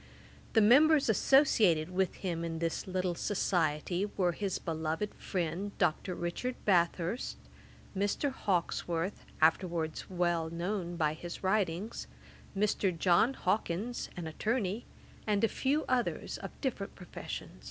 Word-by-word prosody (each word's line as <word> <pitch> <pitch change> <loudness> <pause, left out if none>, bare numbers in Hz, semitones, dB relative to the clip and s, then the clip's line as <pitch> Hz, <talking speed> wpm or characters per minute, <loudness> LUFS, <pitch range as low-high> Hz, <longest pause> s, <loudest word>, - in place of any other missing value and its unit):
The 220 - +6
members 285 +6 +6
associated 210 - +4
with 185 0 0
him 170 -3 -3
in 165 -1 -3
this 165 +2 -2
little 185 -1 0
society 175 -1 0
were 180 -3 +3
his 195 +2 -2
beloved 160 +5 -2
friend 185 +2 -3
Dr. 175 +1 0
Richard 175 +10 -3
Bathurst, 180 +3 +1 0.6
Mr. 205 +8 0
Hawkesworth, 175 -2 -1 0.2
afterwards 165 -1 +1
well 175 -3 0
known 175 +1 -3
by 155 -3 +1
his 170 +4 -8
writings, 190 +1 0 0.5
Mr. 195 -3 +1
John 185 +10 +4
Hawkins, 205 +4 -1
an 175 - -4
attorney, 215 +5 -1 0.4
and 205 -1 +2
a - - +6
few 280 +7 0
others 250 -2 -1
of - - -9
different 235 -8 -3
professions. 180 - -7
185 Hz, 120 wpm, -32 LUFS, 170-210 Hz, 0.6 s, The